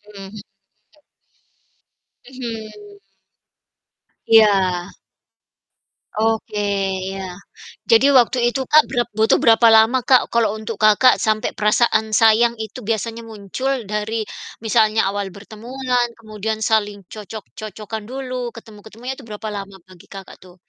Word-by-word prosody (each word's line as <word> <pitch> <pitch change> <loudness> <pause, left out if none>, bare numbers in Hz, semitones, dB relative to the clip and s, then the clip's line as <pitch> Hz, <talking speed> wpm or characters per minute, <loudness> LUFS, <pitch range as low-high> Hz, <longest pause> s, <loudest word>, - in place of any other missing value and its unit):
mhm. 195 0 -10 2.0
Mhm. 230 -4 -7 1.6
Iya. 195 -5 +3 1.3
Oke, 220 -1 -1 0.5
iya. 195 0 -5 0.7
Jadi 230 +4 +6
waktu 250 +1 +3
itu, 270 - -3
Kak, 310 0 +7
berap 240 -2 0
butuh 220 +1 +3
berapa 230 +1 +4
lama, 220 +4 +5
Kak 255 0 +4
kalau 230 -3 +2
untuk 220 +1 -5
Kakak 215 +4 +6
sampai 215 0 -1
perasaan 220 0 +1
sayang 225 +2 +4
itu 220 +3 -7
biasanya 225 +2 -3
muncul 220 +4 -4 0.2
dari 215 +1 -3 0.4
misalnya 220 -2 +2
awal 200 0 -3
bertemuan 245 +4 -3
kemudian 215 0 -5
saling 210 -3 -1
cocok-cocokan 215 0 -8
dulu, 255 -2 -5
ketemu-ketemunya 225 +3 -9
itu 270 - -14
berapa 215 +1 -6
lama 195 0 -16
bagi 185 -2 -17
Kakak 195 -1 -10
tuh? 180 -1 -17
220 Hz, 110 wpm, -20 LUFS, 210-235 Hz, 2.0 s, Kak